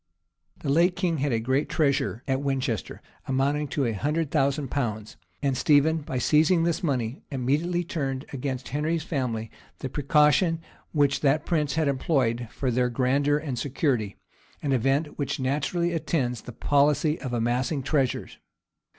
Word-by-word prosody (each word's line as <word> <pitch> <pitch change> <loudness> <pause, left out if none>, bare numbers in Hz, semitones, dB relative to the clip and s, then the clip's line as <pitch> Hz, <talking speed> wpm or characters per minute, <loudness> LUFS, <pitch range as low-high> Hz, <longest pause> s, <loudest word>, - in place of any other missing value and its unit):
[] 85 0 -43
The 145 - -2
late 170 +5 +3
king 175 -4 0
had 140 0 0
a 115 - +1
great 130 +5 0
treasure 140 -5 0
at 135 0 0
Winchester, 135 -6 -2 0.2
amounting 140 +3 +1
to 140 0 -1
a 115 - +1
hundred 150 +7 -1
thousand 140 -2 +1
pounds; 110 -6 -3 0.3
and 135 -2 +1
Stephen, 145 +4 +4
by 135 -3 -4
seizing 155 +7 +3
this 170 -1 0
money, 130 -6 -1
immediately 150 +7 0
turned 140 -7 -3
against 130 -1 -4
Henry's 155 +4 -1
family 120 -9 -3 0.3
the 130 - -5
precaution 150 +4 +3 0.3
which 145 -3 +2
that 145 +1 +2
prince 150 -5 0
had 160 -2 +1
employed 130 -4 0
for 130 +1 -2
their 125 +1 +1
grandeur 140 +4 +2
and 145 -5 -4
security; 125 -7 -1 0.5
an 145 - 0
event 135 +6 0
which 140 -1 -2
naturally 150 +6 0
attends 130 -8 -1
the - - -9
policy 145 +5 +2
of 130 - -4
amassing 125 +4 0
treasures. 135 -3 -1
140 Hz, 155 wpm, -26 LUFS, 125-150 Hz, 0.5 s, Stephen